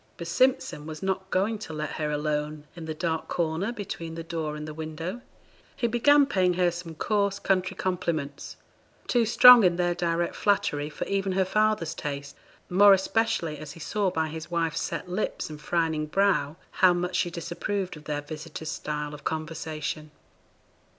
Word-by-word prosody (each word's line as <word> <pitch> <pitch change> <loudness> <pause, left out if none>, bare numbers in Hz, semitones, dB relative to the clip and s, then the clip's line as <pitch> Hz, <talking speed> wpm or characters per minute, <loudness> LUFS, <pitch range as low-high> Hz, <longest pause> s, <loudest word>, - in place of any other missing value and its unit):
But 170 - -6
Simpson 255 - +1
was 155 +1 -7
not 190 0 -2
going 205 +4 0
to 165 - -7
let 155 0 -3
her 150 -1 -2
alone 150 0 -2
in 170 -2 -7
the 160 - -3
dark 160 -1 -2
corner 170 +5 -1
between 170 -7 -6
the 165 - -5
door 160 -2 -3
and 150 0 -6
the 155 - -6
window. 160 +7 -5 0.5
He 240 - -1
began 280 +5 +5
paying 185 -9 +2
her 180 -1 +3
some 170 -1 -7
coarse 200 +2 0
country 185 -2 0
compliments 170 -6 -3 0.5
too 235 -3 +2
strong 245 +1 +9
in 180 -2 +4
their 175 0 +1
direct 170 0 -1
flattery 150 -8 +1
for 150 - -5
even 195 -1 -1
her 190 0 +2
father's 215 -4 +1
taste, 140 -1 -5 0.3
more 200 +2 +7
especially 190 -6 0
as 155 -1 -8
he - - -13
saw 200 +4 0
by 160 -2 -1
his 160 +1 -7
wife's 165 -2 0
set - - -4
lips 180 -3 -3
and 150 -1 -9
frowning 160 -2 0
brow 195 -4 +2 0.3
how 185 -1 +7
much 180 +1 -2
she 175 - +1
disapproved 180 +3 -3
of 150 0 -13
their 145 -1 -2
visitor's 155 +1 -7
style 150 -2 -4
of 150 - -10
conversation. 155 -1 -4
170 Hz, 175 wpm, -27 LUFS, 155-190 Hz, 0.5 s, strong